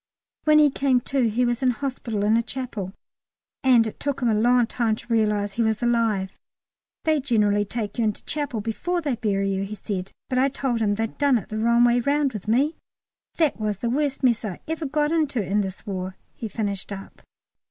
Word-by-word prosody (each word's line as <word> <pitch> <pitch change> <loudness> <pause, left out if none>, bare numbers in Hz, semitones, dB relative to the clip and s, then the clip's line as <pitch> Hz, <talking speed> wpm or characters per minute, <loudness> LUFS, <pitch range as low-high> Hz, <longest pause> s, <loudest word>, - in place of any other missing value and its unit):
When 305 0 +6
he 300 -2 +6
came 265 -2 +2
to 260 -2 +1
he 245 +4 +1
was 240 +1 0
in 260 - +3
hospital 245 -5 -2
in 215 +2 +4
a 230 - +4
chapel, 235 -6 -5 0.7
and 250 -4 +5
it 220 - -6
took 285 -2 -2
him 245 -3 +1
a - - +3
long 240 +3 +4
time 225 -1 0
to 230 - -5
realise 210 -2 +1
he 235 - -1
was 220 0 +1
alive. 225 -5 +1 0.7
"They 310 -1 +2
generally 210 -6 +2
take 215 +2 -4
you 230 - +3
into 210 -1 -2
chapel 285 -7 -2
before 345 - -2
they 285 -6 -1
bury 195 -3 0
you," 190 0 -1
he 205 +2 -5
said, 190 -2 -4 0.2
"but 255 -1 0
I 270 +2 +4
told 260 -4 -1
'em 205 -2 +2
they 225 +2 0
done 275 +3 +2
it 210 - -7
the 215 - -3
wrong 235 +2 +4
way 240 0 +4
round 280 +1 +1
with 210 -2 -7
me. 275 +8 +2 0.6
That 315 -8 +2
was 210 -2 -1
the 235 +4 -2
worst 280 0 -1
mess 235 -3 +3
ever 195 -5 -4 0.3
I - - -1
got 295 +2 +1
into 305 -6 +1
in 205 +3 +1
this 190 -1 -6
War," 185 -1 -4 0.2
he 225 - -6
finished 205 -2 -3
up. 195 -1 -8
230 Hz, 215 wpm, -24 LUFS, 210-265 Hz, 0.7 s, When